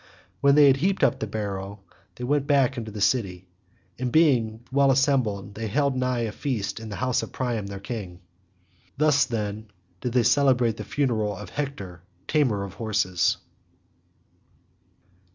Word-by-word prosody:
When 140 Hz, 0 st, +4 dB
they 150 Hz, -1 st, +7 dB
had 135 Hz, -1 st, +5 dB
heaped 190 Hz, +6 st, 0 dB
up 135 Hz, -, +3 dB
the 110 Hz, -, -3 dB
barrow 100 Hz, -1 st, -5 dB, 0.4 s
they 125 Hz, -, -8 dB
went 140 Hz, +2 st, 0 dB
back 140 Hz, -3 st, +4 dB
again 130 Hz, -3 st, -5 dB
into 110 Hz, -1 st, -7 dB
the 105 Hz, -1 st, -7 dB
city, 95 Hz, -6 st, 0 dB, 0.5 s
and 125 Hz, -1 st, -2 dB
being 120 Hz, -8 st, +3 dB
well 140 Hz, +1 st, +4 dB
assembled 125 Hz, -7 st, +1 dB
they 110 Hz, +2 st, -4 dB
held 135 Hz, +3 st, 0 dB
high 125 Hz, -2 st, 0 dB
feast 115 Hz, -3 st, -3 dB
in 110 Hz, -1 st, -8 dB
the 105 Hz, -, -5 dB
house 130 Hz, -1 st, 0 dB
of 110 Hz, -, -7 dB
Priam 120 Hz, -6 st, -2 dB
their 100 Hz, 0 st, -7 dB
king. 100 Hz, -5 st, -6 dB, 0.8 s
Thus, 150 Hz, -1 st, +4 dB
then, 110 Hz, -2 st, -4 dB, 0.3 s
did 125 Hz, -, -3 dB
they 125 Hz, -2 st, +3 dB
celebrate 120 Hz, -2 st, +3 dB
the -, -, -5 dB
funeral 115 Hz, -8 st, -1 dB
of 105 Hz, -3 st, -9 dB
Hector 100 Hz, -, -5 dB, 0.3 s
tamer 125 Hz, -10 st, +1 dB
of 100 Hz, -2 st, -7 dB
horses. 100 Hz, -6 st, 0 dB
120 Hz, 160 wpm, -25 LUFS, 105-135 Hz, 0.8 s, they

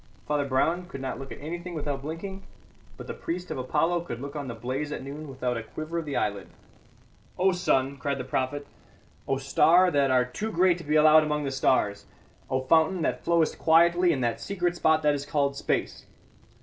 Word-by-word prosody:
Father 150 Hz, -1 st, 0 dB
Brown 165 Hz, +7 st, 0 dB
could 135 Hz, -, -8 dB
not 130 Hz, 0 st, -4 dB
look 135 Hz, 0 st, -9 dB
at -, -, -8 dB
anything 175 Hz, +4 st, -6 dB
without 145 Hz, -3 st, -3 dB
blinking; 170 Hz, +6 st, -6 dB, 0.6 s
but -, -, -8 dB
the -, -, -5 dB
priest 180 Hz, +2 st, -5 dB
of -, -, -3 dB
Apollo 165 Hz, +7 st, +1 dB
could 120 Hz, -8 st, -6 dB
look 140 Hz, +3 st, -7 dB
on 145 Hz, -2 st, -4 dB
the 120 Hz, -, -5 dB
blaze 130 Hz, +6 st, -4 dB
at 150 Hz, -, -5 dB
noon 145 Hz, +3 st, -7 dB
without 125 Hz, -3 st, -3 dB
a -, -, -3 dB
quiver 155 Hz, +8 st, -5 dB
of 165 Hz, -, -6 dB
the 145 Hz, -, -4 dB
eyelid. 100 Hz, -1 st, -1 dB, 0.9 s
"O 190 Hz, +1 st, +3 dB
sun," 140 Hz, -6 st, 0 dB
cried 140 Hz, +1 st, -2 dB
the 130 Hz, -, -4 dB
prophet, 130 Hz, +3 st, -2 dB, 0.6 s
"O 135 Hz, -, +1 dB
star 160 Hz, +7 st, +4 dB
that 140 Hz, -3 st, +2 dB
art 125 Hz, -1 st, +2 dB
too 220 Hz, +1 st, -3 dB
great 180 Hz, -1 st, +3 dB
to -, -, -8 dB
be 150 Hz, +1 st, -1 dB
allowed 155 Hz, +1 st, +7 dB
among 150 Hz, -1 st, -1 dB
the 135 Hz, -, -2 dB
stars! 125 Hz, -6 st, +1 dB, 0.4 s
O 130 Hz, 0 st, 0 dB
fountain 160 Hz, +5 st, +3 dB
that 125 Hz, -3 st, -1 dB
flowest 170 Hz, -2 st, +1 dB
quietly 170 Hz, +2 st, +4 dB
in 135 Hz, -5 st, -1 dB
that 120 Hz, -1 st, -1 dB
secret 180 Hz, -3 st, -1 dB
spot 160 Hz, -2 st, +2 dB
that 150 Hz, -1 st, +4 dB
is 140 Hz, -1 st, -3 dB
called 140 Hz, -1 st, 0 dB
space. -, -, -2 dB
150 Hz, 205 wpm, -27 LUFS, 135-170 Hz, 0.9 s, allowed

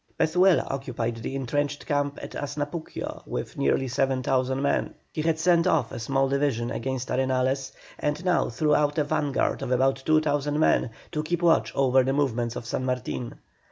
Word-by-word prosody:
Pezuela 180 Hz, +2 st, +4 dB
occupied 120 Hz, -4 st, -3 dB
the 115 Hz, +4 st, -5 dB
entrenched 145 Hz, +2 st, -2 dB
camp 145 Hz, -1 st, 0 dB
at -, -, -7 dB
Asnapuquio 145 Hz, +3 st, -5 dB
with -, -, -4 dB
nearly 70 Hz, -, +1 dB
7,000 130 Hz, 0 st, 0 dB
men. 140 Hz, +1 st, 0 dB, 0.2 s
He 155 Hz, -, -2 dB
had 160 Hz, 0 st, +1 dB
sent 170 Hz, +1 st, +3 dB
off 125 Hz, -10 st, +2 dB
a -, -, -5 dB
small 135 Hz, +4 st, +1 dB
division 135 Hz, -4 st, 0 dB
against 130 Hz, 0 st, -3 dB
Arenales, 130 Hz, +1 st, 0 dB, 0.3 s
and 150 Hz, +4 st, -2 dB
now 180 Hz, -2 st, +2 dB
threw 150 Hz, +6 st, +1 dB
out 150 Hz, 0 st, +2 dB
a 150 Hz, -, +3 dB
vanguard 145 Hz, -1 st, 0 dB
of -, -, -3 dB
about 135 Hz, +1 st, +2 dB
2,000 150 Hz, -1 st, +1 dB
men 155 Hz, -, +3 dB, 0.2 s
to 150 Hz, -, -1 dB
keep 170 Hz, +3 st, -2 dB
watch 115 Hz, -10 st, +4 dB
over 130 Hz, -1 st, +4 dB
the 130 Hz, +1 st, 0 dB
movements 120 Hz, -5 st, 0 dB
of -, -, -6 dB
San 120 Hz, -, -2 dB
Martin. 125 Hz, -1 st, -3 dB
135 Hz, 170 wpm, -26 LUFS, 130-150 Hz, 0.3 s, Pezuela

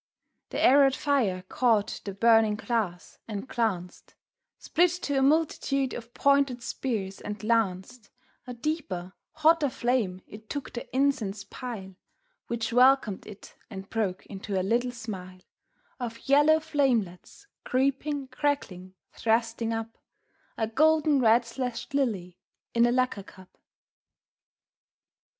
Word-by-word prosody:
The -, -, -4 dB
arrowed 270 Hz, 0 st, +5 dB
fire 230 Hz, -11 st, 0 dB
caught 225 Hz, -4 st, +1 dB
the 200 Hz, -, -4 dB
burning 225 Hz, 0 st, +4 dB
glass 210 Hz, -6 st, -3 dB
and 210 Hz, +2 st, -5 dB
glanced, 195 Hz, -9 st, -3 dB, 0.4 s
Split 350 Hz, +2 st, +2 dB
to 285 Hz, -2 st, 0 dB
a -, -, +1 dB
multitude 275 Hz, -2 st, +1 dB
of 235 Hz, 0 st, -8 dB
pointed 280 Hz, -4 st, +2 dB
spears, 210 Hz, -8 st, -3 dB
and 210 Hz, +1 st, -6 dB
lanced, 215 Hz, 0 st, -1 dB, 0.4 s
A 250 Hz, -, -6 dB
deeper, 230 Hz, -, -4 dB, 0.2 s
hotter 315 Hz, -1 st, +3 dB
flame, 235 Hz, -8 st, -1 dB
it 215 Hz, +1 st, -13 dB
took 285 Hz, -2 st, -5 dB
the 240 Hz, -, -7 dB
incense 255 Hz, -7 st, 0 dB
pile 215 Hz, -7 st, -7 dB, 0.5 s
Which 230 Hz, -1 st, -3 dB
welcomed 250 Hz, -5 st, +4 dB
it 210 Hz, -1 st, -12 dB, 0.2 s
and 195 Hz, -2 st, -9 dB
broke 200 Hz, -5 st, -2 dB
into 195 Hz, -1 st, -4 dB
a -, -, -1 dB
little 235 Hz, +5 st, +1 dB
smile 190 Hz, -6 st, -8 dB, 0.6 s
Of 230 Hz, -2 st, -6 dB
yellow 295 Hz, +3 st, +5 dB
flamelets, 270 Hz, -, -1 dB, 0.2 s
creeping, 275 Hz, +2 st, 0 dB
crackling, 215 Hz, -10 st, -2 dB, 0.2 s
thrusting 230 Hz, 0 st, 0 dB
up, 225 Hz, 0 st, -5 dB, 0.6 s
A 220 Hz, -, +1 dB
golden, 305 Hz, +4 st, +3 dB
red 235 Hz, 0 st, +4 dB
slashed 245 Hz, +1 st, -5 dB
lily 200 Hz, -11 st, -1 dB, 0.3 s
in 235 Hz, 0 st, +4 dB
a -, -, +2 dB
lacquer 255 Hz, -4 st, 0 dB
cup. 190 Hz, -1 st, -16 dB
235 Hz, 125 wpm, -27 LUFS, 205-270 Hz, 0.6 s, arrowed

